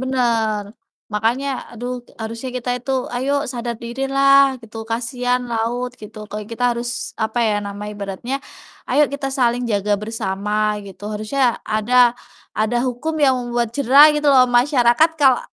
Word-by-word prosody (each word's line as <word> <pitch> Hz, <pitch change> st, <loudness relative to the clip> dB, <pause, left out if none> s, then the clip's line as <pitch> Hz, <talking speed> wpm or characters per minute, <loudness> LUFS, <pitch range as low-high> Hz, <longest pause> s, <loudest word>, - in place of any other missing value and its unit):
bener. 230 Hz, -5 st, 0 dB, 0.5 s
Makanya 230 Hz, +6 st, 0 dB, 0.2 s
aduh 245 Hz, +2 st, -5 dB, 0.2 s
harusnya 230 Hz, +3 st, -5 dB
kita 250 Hz, 0 st, -3 dB
itu 255 Hz, -, -6 dB, 0.2 s
ayo 260 Hz, +3 st, -1 dB, 0.2 s
sadar 235 Hz, -1 st, -4 dB
dirilah 275 Hz, +2 st, +3 dB
gitu, 225 Hz, 0 st, -12 dB
kasihan 245 Hz, +2 st, -1 dB
laut 235 Hz, +2 st, -1 dB
gitu. 215 Hz, +1 st, -11 dB
Kalau 210 Hz, 0 st, -5 dB
kita 245 Hz, +2 st, -2 dB
harus 235 Hz, +1 st, -3 dB, 0.4 s
apa 220 Hz, +2 st, -3 dB
ya 210 Hz, -, +1 dB
nama 200 Hz, +1 st, -6 dB
ibaratnya, 205 Hz, +5 st, -5 dB, 0.5 s
"Ayo 300 Hz, -, +4 dB
kita 280 Hz, -1 st, -3 dB
saling 245 Hz, -1 st, +2 dB
jaga 205 Hz, 0 st, 0 dB
bersama," 210 Hz, 0 st, -1 dB
gitu. 190 Hz, 0 st, -13 dB
Harusnya 235 Hz, +4 st, 0 dB
ada 240 Hz, +3 st, +3 dB, 0.4 s
ada 220 Hz, +3 st, +1 dB
hukum 255 Hz, +6 st, -3 dB
yang 265 Hz, -1 st, +4 dB
membuat 240 Hz, -1 st, -1 dB
jera 280 Hz, +3 st, +7 dB
gitu 295 Hz, 0 st, -1 dB
loh 260 Hz, -2 st, +7 dB
masyarakat 245 Hz, +3 st, +4 dB
kalau, 265 Hz, -3 st, +5 dB
240 Hz, 145 wpm, -20 LUFS, 220-260 Hz, 0.5 s, jera